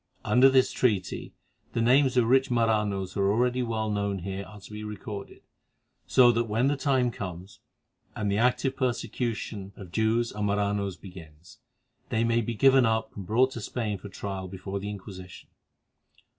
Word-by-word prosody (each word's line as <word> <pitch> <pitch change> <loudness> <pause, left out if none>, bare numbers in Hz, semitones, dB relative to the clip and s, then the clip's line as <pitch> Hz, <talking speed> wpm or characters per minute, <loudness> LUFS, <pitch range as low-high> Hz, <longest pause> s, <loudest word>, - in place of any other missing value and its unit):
Under 125 +5 +6
this 130 -1 +4
treaty 105 -8 -1 0.4
the - - -1
names 130 +2 +4
of 120 - +5
rich 130 +3 +3
Maranos 105 -5 0
that - - -4
are 100 0 +3
already 125 +3 +1
well 110 -2 -1
known 100 -1 -1
here 95 +2 -5
are 105 +1 -12
to 100 - -14
be 105 0 -7
recorded, 105 -1 -7 0.6
so 125 -2 +6
that 115 0 0
when 115 +5 +1
the 145 - +1
time 130 -3 +1
comes, 95 -2 -8 0.6
and 105 -1 -1
the 100 - +1
active 125 +2 +1
persecution 115 -5 -3
of 95 -4 -11
Jews 110 +3 +1
and 105 0 -2
Maranos 100 -2 -1
begins, 85 -4 -13 0.5
they 115 +1 +1
may 115 0 +2
be 115 +1 -3
given 135 +2 +5
up 110 -1 0
and 100 -3 -7
brought 125 +5 +3
to 120 - -6
Spain 105 -3 -3
for 100 - -9
trial 95 -1 -5
before 95 +1 -5
the 100 +1 -5
Inquisition. 95 -3 -9
110 Hz, 170 wpm, -27 LUFS, 100-120 Hz, 0.6 s, Under